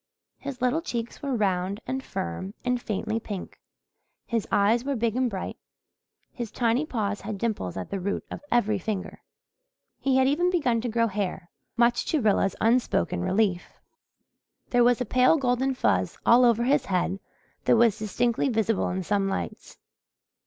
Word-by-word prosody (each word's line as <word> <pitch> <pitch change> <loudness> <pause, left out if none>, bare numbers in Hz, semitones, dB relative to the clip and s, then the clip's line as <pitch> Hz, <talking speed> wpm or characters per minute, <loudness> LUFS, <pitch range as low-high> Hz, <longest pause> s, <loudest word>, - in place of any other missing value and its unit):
His 270 -2 -6
little 255 +6 +2
cheeks 235 -8 -5
were 275 -3 -1
round 195 -2 0
and 265 0 -3
firm 185 - -5
and 250 -1 0
faintly 220 +1 -2
pink, 205 -4 -7 0.7
his 230 -2 -2
eyes 215 +4 +3
were 280 0 -1
big 230 -1 0
and 255 -1 +1
bright, 190 -4 -5 0.8
his 240 -3 -5
tiny 240 +7 0
paws 210 -6 -2
had 210 0 -5
dimples 195 - -2
at 95 - -6
the 195 - -2
root 200 +2 -3
of - - -6
every 215 -4 +2
finger. 195 0 -4 0.8
He 270 -1 +2
had 260 0 +4
even 335 +6 +2
begun 260 -11 +1
to 240 - -2
grow 230 +1 +2
hair, 190 -4 -3 0.3
much 240 0 +3
to 315 - +1
Rilla's 205 -4 +2
unspoken 225 - +1
relief. 190 - 0 0.9
There 245 -1 +5
was 245 0 +3
a - - 0
pale 255 +7 +4
golden 260 0 +1
fuzz - - +1
all 245 +2 +6
over 235 -1 +3
his 280 +4 +2
head 185 0 0 0.5
that - - +5
was 225 -2 +4
distinctly 235 +5 0
visible 225 -3 +1
in 185 +1 -2
some 195 +1 0
lights. 195 - -5
230 Hz, 165 wpm, -26 LUFS, 200-250 Hz, 0.9 s, all